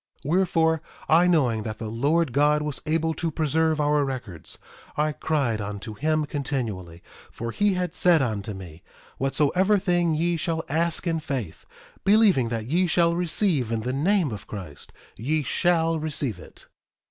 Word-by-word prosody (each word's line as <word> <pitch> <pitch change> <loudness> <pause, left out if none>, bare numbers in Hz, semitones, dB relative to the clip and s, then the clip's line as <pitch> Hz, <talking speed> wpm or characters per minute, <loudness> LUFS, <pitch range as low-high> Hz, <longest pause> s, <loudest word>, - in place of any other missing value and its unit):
1:15 - - -3
Wherefore, 165 -3 +2 0.3
I 170 +3 +5
knowing 130 -11 +2
that 110 0 -5
the 110 - -5
Lord 140 +6 +1
God 150 +2 +3
was 150 -2 -4
able 160 +1 +1
to 165 +2 -2
preserve 160 +1 +1
our 150 0 +2
records, 120 - -5 0.4
I 155 +1 +2
cried 140 -8 -1
unto 105 +1 -6
him 155 +6 0
continually, 115 - -4 0.3
for 115 0 -5
he 205 - +1
had 180 -1 -2
said 175 -2 +4
unto 105 -6 -2
me: 90 -3 -10 0.4
Whatsoever 150 +9 +2
thing 175 -4 +1
ye 170 +2 +1
shall 160 0 -2
ask 165 +3 0
in 165 -2 0
faith, 130 - -5 0.4
believing 195 - +4
that 115 -2 -3
ye 175 +8 +1
shall 170 0 +3
receive 170 - 0
in 115 -1 -1
the 125 +3 -3
name 170 - +2
of 105 -2 -7
Christ, 90 -9 -8 0.3
ye 150 +8 0
shall 165 +2 +1
receive 140 - -2
it. - - -13
150 Hz, 160 wpm, -25 LUFS, 115-165 Hz, 0.4 s, I